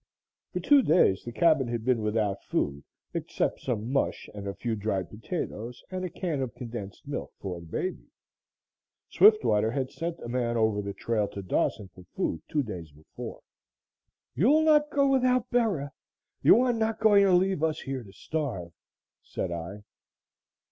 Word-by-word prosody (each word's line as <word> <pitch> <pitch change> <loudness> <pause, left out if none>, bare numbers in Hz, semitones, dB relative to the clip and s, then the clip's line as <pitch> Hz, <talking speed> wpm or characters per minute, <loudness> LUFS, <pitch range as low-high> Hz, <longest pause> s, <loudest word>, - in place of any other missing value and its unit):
For - - -2
two 290 -2 +5
days 155 - +3
the 120 - -6
cabin 155 -1 +3
had 115 -1 -3
been 125 -3 +2
without 105 -2 0
food 70 0 -2 0.3
except - - -1
some 115 -2 -2
mush 140 - 0
and 100 -1 -7
a 100 - -4
few 115 -2 -2
dried 100 -4 -2
potatoes 120 - -5
and 185 0 -3
a 180 - -2
can 160 -5 -3
of 125 -4 -4
condensed 115 -1 -7
milk 145 - -4
for 90 -3 -5
the 85 - -12
baby. 185 - -4 1.0
Swiftwater 410 - +5
had 130 +2 -2
sent 165 0 -4
a - - -6
man 120 -1 -1
over 110 -2 +2
the 100 0 -5
trail 110 -3 0
to 100 -1 -7
Dawson 95 +2 0
for 90 - -14
food 80 - -1
two 150 -2 +1
days 90 - -7
before. 75 +2 -9 0.9
"You'll 290 - +4
not 300 -1 +4
go 280 -1 +3
without 255 -2 +2
Bera! 205 - +1 0.5
You 235 - +7
are 250 -1 +2
not 225 -1 -1
going 205 -2 +6
to 195 - +4
leave 185 -2 +3
us 160 -1 0
here 135 -2 -4
to 100 -4 -13
starve," 100 - -4 0.5
said 90 - -4
I. 85 +5 -6
125 Hz, 170 wpm, -28 LUFS, -, 1.0 s, You